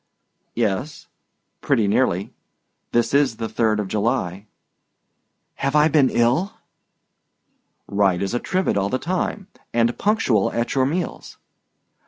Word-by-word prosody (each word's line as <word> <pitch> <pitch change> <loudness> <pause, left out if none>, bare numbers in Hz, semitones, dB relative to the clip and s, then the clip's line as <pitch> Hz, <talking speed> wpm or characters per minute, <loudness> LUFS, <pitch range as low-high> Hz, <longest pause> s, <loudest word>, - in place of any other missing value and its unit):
"Yes, 120 +6 -2 0.6
pretty 110 -3 +2
nearly; 100 -3 0 0.6
this 120 +2 +1
is 140 -5 +3
the 115 0 -4
3d 110 -1 +1
of 105 -2 -2
July." 105 -2 -1 1.1
"Have 140 +2 -1
I 150 +1 +5
been 145 -3 +4
ill?" 125 +12 +1 1.3
"Right 100 -3 +2
as 100 - -3
a 120 - 0
trivet 185 - -1
all 100 0 0
the 130 - 0
time, 185 +5 -2 0.3
and 120 0 +2
punctual 130 - +2
at 120 0 -1
your 130 -1 +2
meals." 170 +4 -4
120 Hz, 125 wpm, -22 LUFS, 105-145 Hz, 1.3 s, I